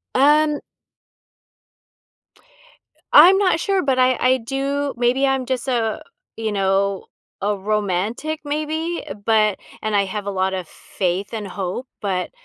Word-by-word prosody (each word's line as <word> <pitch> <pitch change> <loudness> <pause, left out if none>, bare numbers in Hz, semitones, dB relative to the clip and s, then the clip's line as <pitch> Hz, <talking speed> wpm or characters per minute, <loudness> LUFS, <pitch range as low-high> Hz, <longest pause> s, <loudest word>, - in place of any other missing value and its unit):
Um 295 +2 +4 2.5
I'm 360 +6 +9
not 370 -5 +2
sure, 390 +2 +1
but 265 -2 +1
I 255 -1 +4
I 255 +1 +3
do 275 +3 -2
maybe 245 +3 +2
I'm 270 -1 0
just 255 +1 -3
a, 230 -4 -1 0.4
you 220 -1 -2
know, 195 0 0 0.4
a 205 +1 0
romantic 210 - -2
maybe, 310 +3 -3 0.2
but 215 -3 +3 0.2
and 215 -1 -1
I 200 -1 +3
have 205 +1 -5
a 200 - -2
lot 190 0 0
of 185 -3 -4
faith 185 +5 -3
and 215 -3 -4
hope, 195 +6 -4
but 185 -3 -2
230 Hz, 135 wpm, -21 LUFS, 200-280 Hz, 2.5 s, I'm